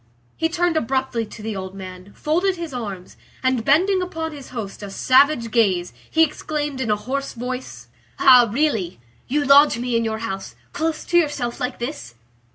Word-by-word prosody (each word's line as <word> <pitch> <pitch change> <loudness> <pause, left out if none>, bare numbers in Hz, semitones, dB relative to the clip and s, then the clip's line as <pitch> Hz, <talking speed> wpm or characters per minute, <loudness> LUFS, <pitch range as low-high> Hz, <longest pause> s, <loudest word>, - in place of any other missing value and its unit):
He 325 0 0
turned 345 -1 +1
abruptly 260 -4 -1
to 215 - -11
the 220 -1 -3
old 190 0 -6
man, 185 0 -9
folded 355 +5 0
his 335 -5 -6
arms, 200 -7 -6 0.3
and 260 -3 +1
bending 370 - +3
upon 325 -3 -4
his 285 -3 -10
host 220 -6 -6
a 205 - -6
savage 255 +2 +3
gaze, 190 -7 +1 0.2
he 320 - +4
exclaimed 295 -2 -2
in 235 - -2
a 210 - +3
hoarse 265 +7 -4
voice:— 250 +2 -6 0.3
"Ah! 250 -3 +7
really! 220 - 0 0.3
You 290 +2 0
lodge 280 -1 +6
me 245 0 -2
in 230 - +2
your 220 -1 -2
house, 195 -3 -6 0.2
close 320 0 -2
to 345 - +2
yourself 285 -7 -2
like 250 0 -3
this?" 240 - -6
255 Hz, 175 wpm, -22 LUFS, 220-300 Hz, 0.3 s, Ah